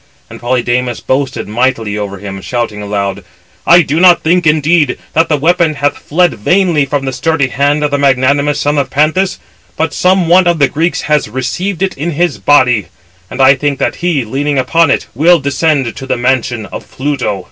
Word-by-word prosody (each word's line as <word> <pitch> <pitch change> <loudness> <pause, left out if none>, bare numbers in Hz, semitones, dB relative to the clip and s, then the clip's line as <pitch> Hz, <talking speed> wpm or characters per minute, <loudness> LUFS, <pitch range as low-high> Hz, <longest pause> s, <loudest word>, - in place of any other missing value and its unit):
And - - -10
Polydamas 120 0 -1
boasted 130 0 -2
mightily 115 -1 -1
over 100 -2 -5
him, 95 0 -8
shouting 115 -2 -4
aloud: 100 -1 -3 0.4
"I 175 +1 +6
do 150 +2 -1
not 180 -1 +5
think, 175 +1 +2
indeed, 155 0 +2 0.2
that 160 +1 +1
the 150 - +1
weapon 165 +1 +1
hath 145 0 -1
fled 175 +3 0
vainly 170 - +1
from 135 0 -2
the 130 - -3
sturdy 140 +1 0
hand 145 +4 0
of 145 - -1
the 145 - 0
magnanimous 140 +2 +1
son 145 0 0
of 140 - -2
Panthous, 165 +6 0 0.4
but 160 +1 -1
some 185 -1 +1
one 180 +2 +4
of 170 -1 +2
the 140 -3 +3
Greeks 160 +2 -1
has 150 -5 0
received 175 - -3
it 190 - -2
in 160 +4 -3
his 175 +3 -1
body; 125 - +3 0.4
and - - -8
I 130 +1 +7
think 140 0 -2
that - - -2
he, 165 -8 -1
leaning 140 +5 -2
upon 165 +5 +2
it, - - 0
will 170 +7 +4
descend 140 -3 -1
to 135 - -8
the - - -1
mansion 125 -2 -1
of - - -9
Pluto." 130 -7 -3
145 Hz, 190 wpm, -12 LUFS, 125-165 Hz, 0.4 s, I